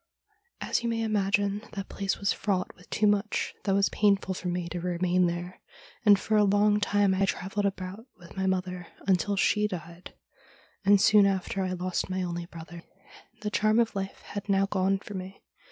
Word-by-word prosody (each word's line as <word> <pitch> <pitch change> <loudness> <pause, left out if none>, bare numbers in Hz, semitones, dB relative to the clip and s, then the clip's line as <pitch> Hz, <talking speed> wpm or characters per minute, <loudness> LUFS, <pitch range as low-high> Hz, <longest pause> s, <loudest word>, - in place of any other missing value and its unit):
' 390 -3 -44
As - - +1
you 235 - -1
may 225 0 -1
imagine, 200 -1 +1
that 195 -1 -5
place 195 -1 -2
was 200 - +1
fraught 190 -3 -2
with 180 - -20
too 215 - +1
much 205 +1 +1
that 195 -2 +2
was 200 0 +3
painful 200 -2 +2
for 180 - -6
me 175 -1 -2
to 175 +1 -4
remain 180 +1 +1
there, 175 +1 -5 0.4
and 205 -3 +7
for 220 - -1
a 210 - +5
long 205 +1 +3
time 205 -1 +2
I 195 +1 +2
travelled 195 +2 -1
about 195 +4 -6
with 175 -2 -15
my 190 0 -1
mother, 180 -2 -2 0.2
until 195 +1 +2
she 210 +1 +2
died, 170 -2 -8 0.7
and 200 0 +5
soon 205 0 +6
after 195 0 -1
I 185 -1 -1
lost 185 +1 -2
my 185 0 -1
only 175 -1 -4
brother, 170 0 -10 0.6
The 210 -1 -3
charm 215 +1 +2
of 235 -1 +2
life 195 0 -4
had 205 0 -7
now 195 0 +3
gone 195 0 +1
for 205 +1 -10
me. 190 0 -8
195 Hz, 195 wpm, -28 LUFS, 185-205 Hz, 0.7 s, and